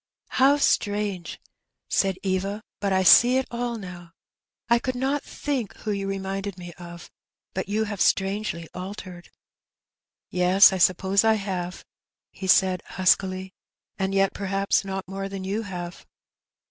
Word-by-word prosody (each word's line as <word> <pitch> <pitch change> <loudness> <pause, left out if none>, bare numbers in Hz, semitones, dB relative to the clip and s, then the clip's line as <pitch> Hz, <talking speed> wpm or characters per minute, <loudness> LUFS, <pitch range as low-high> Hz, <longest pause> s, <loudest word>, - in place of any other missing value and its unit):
'^ - - -68 0.3
How 275 +2 +4
strange! 205 -8 0 0.3
" - - -59
said 195 -1 +1
Eva; 195 +2 -2
" - - -67
but 200 -1 0
I 190 0 +2
see 245 +7 +7
it 265 - 0
all 240 0 -3
now. 175 -4 -10 0.5
I 235 +1 +4
could 255 +1 -3
not 270 +3 0
think 270 -7 -4
who 215 - -4
you 200 -1 -2
reminded 195 0 -4
me 175 -1 -9
of; 170 0 -10 0.4
but 190 +1 -4
you 215 +2 +1
have 205 -3 -4
strangely 195 -3 0
altered." 180 -1 -8 0.6
" - - -68
Yes, 190 +3 +7
I 190 - -2
suppose 190 +3 +3
I 220 0 +4
have," 185 -3 -4 0.5
he 190 - -7
said 185 -1 +4
huskily; 185 0 +1
^' 190 - -13 0.5
and 190 0 -1
yet, 195 0 +2
perhaps, 195 0 0
not 195 -1 -5
more 195 +1 -5
than 195 -1 -6
you 200 +4 -2
have.' 180 -4 -7
195 Hz, 160 wpm, -25 LUFS, 185-210 Hz, 0.6 s, see